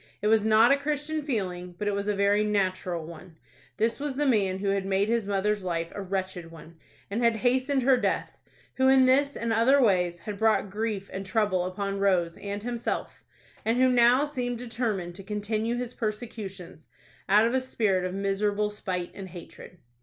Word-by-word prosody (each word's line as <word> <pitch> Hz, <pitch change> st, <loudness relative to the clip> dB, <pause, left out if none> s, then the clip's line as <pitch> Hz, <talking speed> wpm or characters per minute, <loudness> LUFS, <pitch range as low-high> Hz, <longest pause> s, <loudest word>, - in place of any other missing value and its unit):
It 210 Hz, -, -6 dB
was 220 Hz, -1 st, +4 dB
not 220 Hz, +3 st, +5 dB
a 280 Hz, -, +5 dB
Christian 300 Hz, +2 st, -2 dB
feeling, 180 Hz, -, -3 dB
but 205 Hz, -, -3 dB
it 205 Hz, -, +1 dB
was 200 Hz, +1 st, -2 dB
a 210 Hz, -, +1 dB
very 200 Hz, +1 st, +3 dB
natural 185 Hz, -5 st, -1 dB
one. 165 Hz, 0 st, -12 dB, 0.4 s
This 225 Hz, +3 st, 0 dB
was 285 Hz, -2 st, -3 dB
the 295 Hz, +2 st, 0 dB
man 200 Hz, -8 st, +2 dB
who 200 Hz, +1 st, -2 dB
had 195 Hz, 0 st, 0 dB
made 195 Hz, +2 st, 0 dB
his 230 Hz, -3 st, 0 dB
mother's 205 Hz, 0 st, 0 dB
life 170 Hz, -2 st, -2 dB
a 205 Hz, -, -5 dB
wretched 185 Hz, -3 st, -4 dB
one, 165 Hz, 0 st, -13 dB, 0.4 s
and 230 Hz, +4 st, -1 dB
hastened 255 Hz, +4 st, +2 dB
her 260 Hz, 0 st, +5 dB
death; -, -, -1 dB, 0.4 s
who 260 Hz, 0 st, +3 dB
in 265 Hz, -1 st, +6 dB
this 280 Hz, +2 st, +3 dB
and 230 Hz, -1 st, -1 dB
other 245 Hz, +5 st, +4 dB
ways 180 Hz, -7 st, +2 dB
had 200 Hz, +3 st, -7 dB
brought 220 Hz, -3 st, +2 dB
grief 210 Hz, -2 st, -3 dB
and 190 Hz, -, -4 dB
trouble 190 Hz, -2 st, 0 dB
upon 195 Hz, +2 st, -3 dB
Rose 180 Hz, -4 st, +2 dB
and 200 Hz, 0 st, -5 dB
himself, 240 Hz, 0 st, -4 dB, 0.4 s
and 225 Hz, +2 st, +1 dB
who 255 Hz, 0 st, +4 dB
now 250 Hz, +3 st, +5 dB
seemed 250 Hz, -4 st, -3 dB
determined 225 Hz, -7 st, -3 dB
to 195 Hz, -, -9 dB
continue 215 Hz, +3 st, -2 dB
his 245 Hz, 0 st, -4 dB
persecutions, 210 Hz, -7 st, -6 dB, 0.4 s
out 210 Hz, +3 st, +6 dB
of 235 Hz, -, 0 dB
a 260 Hz, -, +2 dB
spirit 210 Hz, -7 st, 0 dB
of 185 Hz, 0 st, -3 dB
miserable 205 Hz, +1 st, 0 dB
spite 185 Hz, -4 st, -4 dB
and 190 Hz, -2 st, -8 dB
hatred. 180 Hz, +1 st, -12 dB
210 Hz, 190 wpm, -27 LUFS, 190-240 Hz, 0.4 s, in